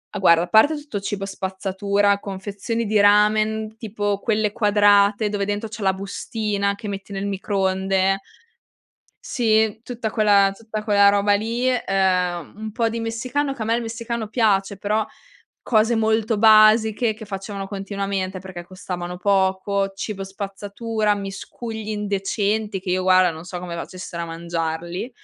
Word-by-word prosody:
Ah, 205 - -2
guarda 170 -3 +5
a 175 - -4
parte 230 +8 +5
tutto 290 -9 -5
cibo 195 0 -4
spazzatura, 195 +1 0
confezioni 200 +4 -4
di 210 0 +2
ramen, 215 +1 +3
tipo 205 -2 -2
quelle 215 -1 0
quadrate 205 -1 +4
dove 205 -1 -2
dentro 205 +2 -3
c'è 215 0 -8
la 190 - +3
bustina 200 +1 -2
che 210 +1 -8
metti 200 0 -6
nel 195 0 -3
microonde 195 -1 0 1.0
Sì 220 -2 +1
tutta 235 -3 -4
quella 200 -3 +4
tutta 220 0 -6
quella 200 -1 +5
roba 205 0 +3
lì, 230 +4 -1
ehm, 185 - 0
un 215 +1 -6
po' 230 +1 0
di 230 +1 -3
messicano, 255 +5 -2
che 240 - -10
a - - -1
me 225 +1 +2
il 240 - -1
messicano 230 -1 -4
piace 200 -4 +1
però, 210 +2 0 0.6
cose 225 0 +2
molto 220 0 +1
basiche 220 +1 +5
che 220 +1 -10
facevano 195 0 -6
continuamente 195 -1 -3
perché 180 -2 -8
costavano 180 -1 -6
poco, 195 +1 +1
cibo 195 -1 -4
spazzatura, 205 +3 -2
miscugli 210 +3 -6
indecenti 205 0 -1
che 185 0 -5
io 185 +1 +1
guarda 185 -1 +5
non 160 +1 -9
so 180 0 -6
come 175 -1 -6
facessero 170 0 -7
a - - -8
mangiarli, 170 +4 -4
205 Hz, 150 wpm, -22 LUFS, 195-220 Hz, 1.0 s, guarda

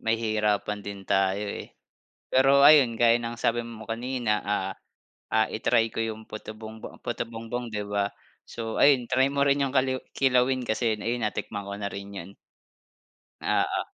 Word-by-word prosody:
nahihirapan 105 -2 0
din 100 -1 -8
tayo, 95 +2 +1
eh. - - -7 0.6
Pero 135 +2 +5
ayun 140 -6 +7
gaya 120 +1 +4
ng 120 0 -5
sabi 120 0 +1
mo 115 -2 -9
kanina, 115 -2 -1
ah, 95 -2 -2 0.6
ah, 110 0 +4
i-try 115 +1 +2
ko - - -2
'yong 110 0 -5
puto 110 0 -8
bumbong 110 0 -9
puto - - -2
bumbong 115 +1 -5
'di 105 -1 -2
ba? 100 0 0 0.4
So 115 -1 -4
ayun 140 -4 +5
try 130 +1 +3
mo 140 0 +2
rin 140 0 +3
'yong 135 0 -3
kaliwi 130 0 +2 0.2
kilawin 130 -1 +2
kasi 110 0 0
ayun 120 +3 -2
natikman 100 -1 -4
ko 100 - -4
na 100 -1 -3
rin 100 0 -7
'yan. 95 0 -7 1.1
Oo, - - +1
115 Hz, 165 wpm, -26 LUFS, 105-125 Hz, 1.1 s, ayun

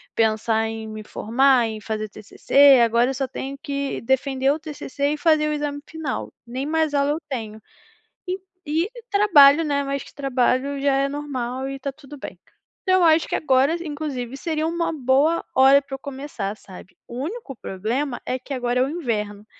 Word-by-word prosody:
pensar 220 0 +1
em 220 0 -6
me 215 0 -7
formar, 250 +3 +2
em 220 -1 -6
fazer 215 0 -3
TCC. 270 +6 +4
Agora 235 +2 +3
eu - - -1
só 270 0 -2
tenho 270 +2 -6
que 280 -2 -3
defender 265 +2 +1
o 305 - -1
TCC 290 -2 -3
e - - -3
fazer 310 -1 +3
o 300 - 0
exame 290 -1 -3
final, 320 -4 -4
nem 255 +4 -4
mais 315 -1 +1
aula 280 0 +2
eu 305 - -1
tenho, 220 -5 -5 0.7
e 370 +1 -2 0.3
e 320 +6 0 0.2
trabalho, 330 -7 +6
né, 285 -2 0
mas 275 0 -3
trabalho 275 0 0
já 280 -1 +2
é 275 0 +2
normal 265 -3 -4
e 275 - -4
está 275 +1 -4
tudo 290 +1 -13
bem, - - -9 0.4
então 370 -1 +3
eu - - +4
acho 320 0 +4
que - - -2
agora 275 +2 +3
inclusive 285 -5 -4
seria 315 +1 -2
uma 335 +1 -1
boa 285 +4 +2
hora 270 +2 +7
para 275 -1 -11
eu - - -10
começar, 265 -8 -5
sabe. 185 -2 -14
O 240 - -9
único 350 - -6
problema 240 +7 -3
é 255 - -2
que 275 - -7
agora 245 0 0
é - - +4
o 265 - -1
inverno, 210 -10 -3
275 Hz, 185 wpm, -23 LUFS, 245-295 Hz, 0.7 s, hora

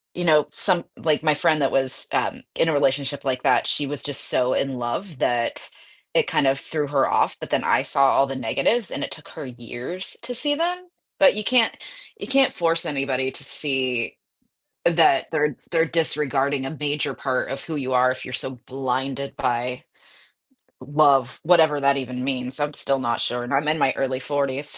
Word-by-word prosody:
you 175 - -2
know, 155 -3 +5
some 175 -2 0
like, 155 -1 0
my 155 - +4
friend 150 0 +2
that 135 - +2
was, 135 -1 -1
um, - - -1
in 165 - +2
a - - +2
relationship 140 0 0
like 130 -2 0
that, - - +3
she 145 - -1
was 145 0 -5
just 145 -1 -5
so 125 0 +1
in 135 -1 -1
love, 125 +8 -4
that 120 -1 0 0.5
it - - +3
kind - - +1
of 135 +1 +2
threw 150 -2 -2
her 140 -1 +2
off, - - +2
but - - -7
then - - +1
I - - +3
saw 140 0 +2
all 135 - +4
the 135 - -4
negatives, 175 - 0
and - - -3
it - - -3
took 155 - -9
her - - -8
years 125 +8 -7
to 245 - -5
see 290 +4 0
them. 360 +3 -2 0.3
But 285 -2 +7
you 215 - -2
can't 240 0 +3 0.4
you - - -6
can't 270 0 +3
force 165 0 0
anybody 135 -3 -1
to - - -12
see 130 -5 -2 0.7
that 165 -5 +4
they're 150 -3 +1
they're 165 -1 +3
disregarding 145 -4 0
a 145 +3 -5
major 145 -1 -1
part 130 -1 -2
of 135 0 -4
who 160 - -5
you 130 -3 -3
are 130 0 +4
if 130 - -6
you're 130 - -7
so 130 -1 -5
blinded 135 +1 -3
by 125 +1 -1 1.0
love, 140 -2 +3
whatever 160 -3 +5
that 140 0 +3
even 125 -1 -4
means, 130 +1 -3
I'm 145 0 -1
still 135 -1 -1
not 120 -2 -1
sure, 120 0 -1
and 120 - -6
I'm 140 +2 +1
in 155 +1 +1
my 135 -2 +3
early 130 -1 -1
40s. 140 0 -2
140 Hz, 200 wpm, -23 LUFS, 130-155 Hz, 1.0 s, But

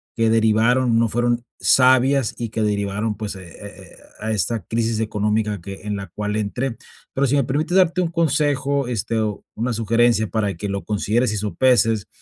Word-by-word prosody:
que 115 -1 +2
derivaron 115 +2 +3
No 115 - +3
fueron 120 +1 0
sabias 130 -1 +4
y 115 - -3
que 115 - -3
derivaron, 105 +1 -1
pues, 105 -2 -5
eh 95 - -11
eh 100 +4 -11 0.2
eh, - - -17 0.2
a 110 - -3
esta 110 +2 0
crisis 115 -1 -1
económica 105 -2 -1
que 95 +2 -9
en 105 0 -3
la 100 -1 -6
cual 105 +4 -4
entré". 115 +4 -2 0.4
Pero 140 +1 +1
si 135 - +1
me 140 - +2
permites 155 +8 0
darte 185 -1 +3
un 175 - 0
consejo, 145 -4 +1
este, 115 -1 -1
o 105 -2 -2
una 120 +3 -2
sugerencia 115 0 +2
para 105 -3 -1
que 105 - -4
lo 100 0 -3
consideres 105 +3 0
y 105 - -2
sopeses. 110 0 +2
115 Hz, 185 wpm, -21 LUFS, 105-125 Hz, 0.4 s, sabias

